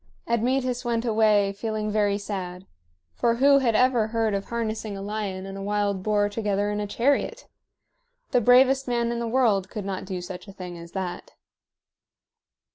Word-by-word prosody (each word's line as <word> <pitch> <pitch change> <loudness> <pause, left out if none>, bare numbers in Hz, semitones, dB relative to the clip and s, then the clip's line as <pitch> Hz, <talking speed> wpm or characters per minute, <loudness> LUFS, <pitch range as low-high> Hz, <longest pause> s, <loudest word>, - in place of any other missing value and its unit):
Admetus 250 +2 0
went 235 -1 -1
away 215 -3 +3
feeling 215 0 -3
very 205 -1 +2
sad; 190 -3 -5 0.5
for 235 -1 +1
who 275 +3 +5
had 235 -4 +1
ever 245 -2 +3
heard 225 -1 0
of 195 0 -2
harnessing 220 -3 -3
a - - -6
lion 200 -2 -4
and 195 0 -7
a - - -6
wild 205 -1 -1
boar 205 0 +2
together 205 -1 -1
in 210 - -2
a 205 - -2
chariot? 280 - 0 0.8
The 245 - +3
bravest 260 +3 +5
man 235 -1 0
in 235 - -2
the 235 - -2
world 225 -6 +2
could 210 -2 -6
not 190 -1 -4
do 185 -2 -4
such 180 +3 -8
a 195 - -10
thing 180 -2 -8
as 170 0 -11
that. 185 -2 -5
215 Hz, 175 wpm, -25 LUFS, 195-235 Hz, 0.8 s, who